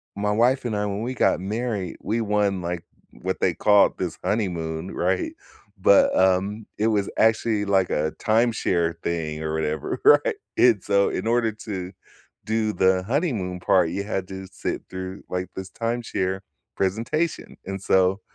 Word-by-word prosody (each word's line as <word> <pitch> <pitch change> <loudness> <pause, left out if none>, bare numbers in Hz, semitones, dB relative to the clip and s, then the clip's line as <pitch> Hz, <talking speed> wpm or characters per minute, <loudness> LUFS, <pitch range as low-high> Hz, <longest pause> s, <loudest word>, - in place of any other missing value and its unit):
my 105 +1 0
wife 125 +4 +2
and 110 -3 -1
I, 105 0 0
when 100 +1 -3
we 125 +2 -2
got 120 - +2
married, 105 -2 -3
we 115 +2 -1
won, 105 -3 +1
like, 85 -1 -4 0.4
what - - -2
they - - +3
called 105 -1 +4
this 85 -3 -3
honeymoon, 85 -5 -2
right? 90 +1 0 0.5
But, 100 +1 +5
um, 95 +3 +2
it 110 - +1
was 105 -3 +1
actually, 110 -1 +2
like, 95 -2 +2
a 75 +1 0
timeshare 110 -7 +1
thing 80 -2 -2
or 80 - -2
whatever, 80 -1 -2
right? 455 +2 +6 0.2
And 115 -6 +5
so, 100 0 +3
in - - -3
order 115 -1 +2
to 95 -4 -6 0.5
do 110 0 0
the 95 0 +3
honeymoon 110 - -1
part, 90 -2 +3
you 100 +4 -3
had 95 -4 -3
to 95 0 -7
sit - - -4
through, 95 +1 -6
like, 90 0 -3
this 95 0 -6
timeshare 115 -5 -2 0.4
presentation, 115 - -1
and 95 0 -4
so, 95 +1 +2
100 Hz, 160 wpm, -24 LUFS, 90-110 Hz, 0.5 s, right